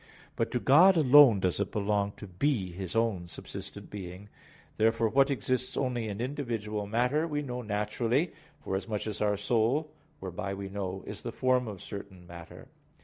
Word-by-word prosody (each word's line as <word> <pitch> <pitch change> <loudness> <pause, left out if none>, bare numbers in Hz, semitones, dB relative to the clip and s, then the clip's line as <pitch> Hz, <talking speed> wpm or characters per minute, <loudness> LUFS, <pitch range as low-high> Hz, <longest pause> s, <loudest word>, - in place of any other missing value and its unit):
But - - 0
to 125 - -1
God 170 +9 +6
alone 135 -7 +7
does 90 0 0
it 100 - -1
belong 100 -1 0
to - - -10
be 95 0 -1
His 90 +2 -6
own 110 -6 0
subsistent - - -9
being. 95 0 -8 0.5
Therefore 115 +1 +3
what 135 +5 +4
exists 130 -2 -1
only 125 -4 -1
in 100 0 -5
individual 115 -6 -3
matter 125 +9 +1
we 150 -2 -2
know 125 -2 -4
naturally, 115 - 0 0.3
forasmuch 100 +2 -3
as 110 -2 -4
our 105 -1 +2
soul, 120 +9 +1 0.3
whereby 100 +2 -4
we 100 0 -6
know, 95 -1 -4
is - - -6
the - - -5
form 125 -1 +1
of 100 -4 -7
certain 95 -3 -9
matter. 85 -1 -11
110 Hz, 165 wpm, -29 LUFS, 100-130 Hz, 0.5 s, alone